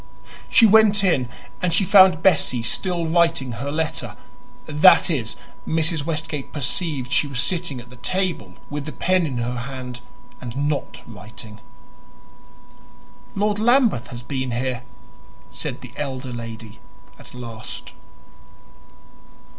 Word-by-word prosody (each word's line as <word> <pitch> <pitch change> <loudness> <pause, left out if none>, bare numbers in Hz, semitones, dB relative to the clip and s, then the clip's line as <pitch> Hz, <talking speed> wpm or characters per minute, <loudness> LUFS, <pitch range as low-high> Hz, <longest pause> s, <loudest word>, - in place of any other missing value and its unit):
She 230 - +6
went 210 -1 +5
in, 140 -10 +2 0.3
and 180 -2 +1
she 170 +4 +3
found 185 -4 +6
Bessie 140 -9 +3
still 175 +6 0
writing 165 -5 +2
her 125 +5 -4
letter; 155 +1 -3 0.5
that 155 +4 +6
is, 120 -8 -2 0.3
Mrs. 160 -2 0
Westgate 155 -3 -3
perceived 145 -2 -2
she - - +3
was 135 -3 -4
sitting 165 -4 -1
at 120 0 -13
the 125 - -13
table 170 - -2
with 145 -1 -5
the 155 - -6
pen 185 -2 +1
in 130 -4 -4
her 120 +1 -2
hand 125 0 -6 0.4
and 125 +4 -2
not 150 -1 -3
writing. 110 0 -11 1.8
"Lord 205 +1 +1
Lambeth 235 - +3
has 120 0 -9
been 130 0 -3
here," 125 +1 -2 0.7
said - - -5
the - - -11
elder 130 -3 -4
lady 115 -2 -8 0.4
at - - -14
last. 115 -3 -8
145 Hz, 130 wpm, -22 LUFS, 125-170 Hz, 1.8 s, She